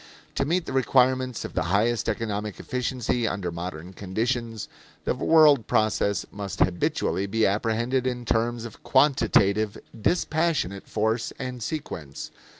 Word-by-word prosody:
To 135 - 0
meet 170 +3 0
the - - -5
requirements 130 -1 +2
of - - -7
the - - 0
highest 110 +4 +1
economic 105 -2 -3
efficiency 125 -2 -1
under 95 -4 -2
modern 85 +1 -6
conditions, 115 +4 -2 0.4
the - - +1
world 150 -7 +5
process 110 -3 +1
must 100 -1 -6
habitually 95 +2 +1
be 110 +2 +2
apprehended 115 +5 0
in 125 -1 -3
terms 115 +1 0
of 115 - -10
quantitative, 110 -7 +3 0.2
dispassionate 155 - 0
force 110 +2 0
and 125 -2 -5
sequence. 85 - -5
115 Hz, 130 wpm, -26 LUFS, 100-130 Hz, 0.4 s, world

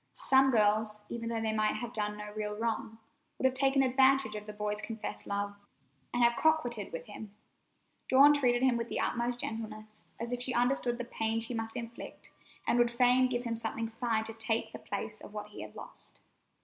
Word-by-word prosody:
Some 270 0 +4
girls, 215 -2 +2
even 230 -1 -4
though 230 -1 -1
they 220 -1 0
might 215 0 +1
have 240 -1 -5
done 210 -1 -2
no 210 0 -7
real 210 -1 -3
wrong, 225 0 -2 0.4
would - - -2
have 260 - +4
taken 270 +1 +3
advantage 265 -2 +4
of 210 0 -6
the - - -5
boy's 210 0 -2
confessed 225 -2 -6
love, 200 0 -2 0.6
and 240 - +2
have 235 0 +5
coquetted 245 -10 +1
with 165 - -6
him. 210 -1 -10 0.7
Dawn 280 +3 +8
treated 250 -4 +2
him 255 -2 +4
with 235 0 -3
the - - -2
utmost 240 0 0
gentleness, 215 -1 -7
as 235 +2 -3
if 245 - -2
she 250 0 -1
understood 245 0 +1
the 245 - -4
pain 225 -1 -1
she 230 +2 -2
must 225 -1 -4
inflict, 235 0 -8 0.3
and 240 - +2
would 240 0 +5
fain 250 +1 +4
give 245 -1 -1
him 230 -2 -2
something 225 0 -3
fine 225 -1 0
to 225 - -6
take 225 0 -1
the - - -7
place 210 +1 -5
of - - -11
what 210 0 -6
he 210 - -9
had - - -9
lost. - - -9
230 Hz, 205 wpm, -31 LUFS, 215-245 Hz, 0.7 s, Dawn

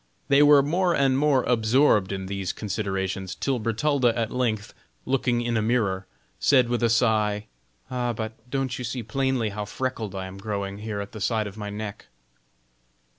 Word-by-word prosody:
They 140 +1 +6
were 145 -1 +7
more 175 +4 +1
and 135 -1 +3
more 140 -2 +3
absorbed 115 -3 +3
in 95 -1 -3
these 95 -1 -3
considerations, 95 -2 -3
till 135 -3 -1
Bertalda 120 +2 +1
at 115 -1 -1
length, 110 -5 -1 0.3
looking 125 -2 +1
in 120 -1 -1
a 110 - +2
mirror, 105 -5 0 0.3
said 130 -4 +4
with 120 0 0
a 115 - +3
sigh: 110 -3 +2 0.5
"Ah, 125 -1 -1
but 110 -1 -4 0.2
don't 135 -1 -2
you - - -4
see 120 +1 -3
plainly 130 0 0
how 105 +1 -4
freckled 110 -2 -4
I 95 -1 -4
am 95 +1 -9
growing 100 -1 -4
here 105 -1 -4
at 100 - -7
the 110 - -8
side 110 0 +1
of 100 -1 -7
my 105 -1 -5
neck?" 105 0 -6
115 Hz, 175 wpm, -25 LUFS, 105-130 Hz, 0.5 s, were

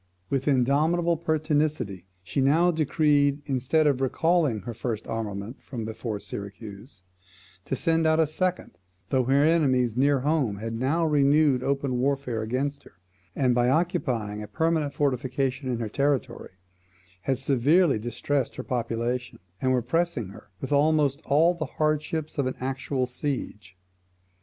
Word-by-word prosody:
With 135 0 -1
indomitable 150 +6 +2
pertinacity 150 - -1 0.2
she 90 +9 -2
now 160 +6 +4
decreed, 145 -2 +2
instead 140 +4 +1
of 140 -3 +2
recalling 150 - +1
her 120 +5 -6
first 115 -1 -4
armament 110 +1 -5
from 120 -5 -6
before 110 -1 -4
Syracuse, 100 0 -9 0.6
to - - -2
send 165 +1 +1
out 160 0 +3
a 160 - +5
second, 175 - -3 0.3
though 130 -2 +2
her 135 +3 +3
enemies 130 -8 +2
near 140 +1 +3
home 140 -8 0
had 115 +2 -5
now 135 +8 0
renewed 145 -2 +3
open 135 -2 -1
warfare 135 -3 -1
against 130 +6 -2
her, - - -18 0.4
and 130 -3 +2
by 120 0 +2
occupying 130 - 0
a 105 - -7
permanent 160 -2 0
fortification 130 -1 -1
in 125 - -1
her 115 -1 -3
territory, 135 -2 -1 0.7
had 135 - +1
severely 140 +3 +3
distressed 120 +4 -2
her - - -5
population, 120 0 -2 0.2
and 130 - +2
were 125 -2 +1
pressing 135 - -1
her 100 - -14
with 135 - -5
almost 145 -1 +2
all 160 +5 +4
the 160 -4 -4
hardships 155 0 -1
of 135 - +1
an 130 - -3
actual 130 0 -2
siege. 125 - -5
135 Hz, 145 wpm, -26 LUFS, 120-155 Hz, 0.7 s, a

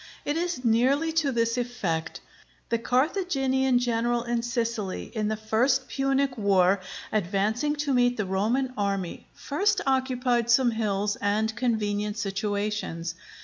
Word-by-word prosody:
It 290 - 0
is 340 -6 -2
nearly 265 +8 +3
to 320 -4 +1
this 230 0 +1
effect: 185 -10 -3 0.5
The 230 - +1
Carthaginian 265 -2 +1
general 240 0 0
in 240 -1 -1
Sicily, 230 -4 -3
in 215 -3 -1
the 215 - 0
first 245 +5 +1
Punic 270 -1 0
war, 195 -1 +3 0.3
advancing 215 - 0
to 290 -1 -1
meet 245 -1 +3
the 210 - -1
Roman 225 +8 0
army, 195 -3 -2
first 395 +7 0
occupied 255 -3 +1
some 245 0 +5
hills 210 -2 -1
and 215 +2 0
convenient 210 -3 -1
situations. 205 -4 -2
235 Hz, 130 wpm, -26 LUFS, 210-260 Hz, 0.5 s, some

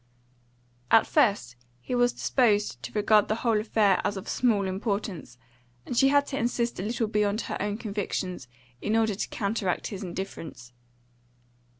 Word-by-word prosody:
At 225 - +6
first 200 - +2 0.2
he 125 - -6
was 245 0 +3
disposed 210 - +1
to - - -7
regard 210 0 +4
the 215 - 0
whole 225 -2 +3
affair 210 -3 +2
as 205 - -1
of 190 - -7
small 220 -6 +1
importance, 190 - -3 0.5
and 245 - -4
she 270 - +5
had 285 +1 +4
to 275 - -3
insist 235 -2 -1
a - - -2
little 225 +2 -1
beyond 210 0 0
her - - -4
own 205 +1 -2
convictions 195 - -4 0.3
in 215 - 0
order 220 -1 +2
to 195 - -4
counteract 200 -3 -2
his 190 - -6
indifference. 170 -9 -7
210 Hz, 160 wpm, -27 LUFS, 190-230 Hz, 0.5 s, At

